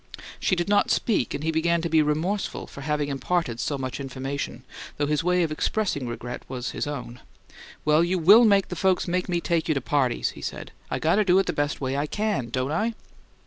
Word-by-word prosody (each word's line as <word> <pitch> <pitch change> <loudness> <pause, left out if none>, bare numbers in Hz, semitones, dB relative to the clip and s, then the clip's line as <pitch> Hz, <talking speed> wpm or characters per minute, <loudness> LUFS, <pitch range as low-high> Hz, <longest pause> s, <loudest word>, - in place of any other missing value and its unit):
She 185 - +2
did 175 0 -1
not 205 0 +3
speak, 210 - +1
and 145 - -5
he 160 - +1
began 170 +1 +2
to - - 0
be 160 -1 +4
remorseful 160 +7 -1
for 140 - -11
having 150 0 -1
imparted 140 -3 -1
so 145 - -1
much 130 -1 -4
information, 135 +1 -5 0.3
though 145 - +1
his 150 +1 0
way 180 0 +2
of 160 - -1
expressing 155 - -1
regret 120 +1 -5
was 130 -1 -4
his - - -3
own. 125 -4 -6 0.7
"Well, 155 +2 +4
you 180 +2 +1
WILL 205 +8 +7
make 200 -3 +4
the 180 - -4
folks 185 +2 +1
make 180 +1 -1
me 175 -1 +1
take 170 -1 0
you 155 - +1
to 140 - -1
parties!" 130 -2 +1
he - - -12
said. - - -6 0.2
"I - - -1
got 165 +5 +2
to 215 - +4
do 185 -2 +4
it 195 - +3
the - - -1
best 145 0 -1
way 135 0 -1
I 145 +2 -1
CAN, 205 - -1
don't 130 +3 -1
I?" 220 +8 0
155 Hz, 225 wpm, -25 LUFS, 140-180 Hz, 0.7 s, WILL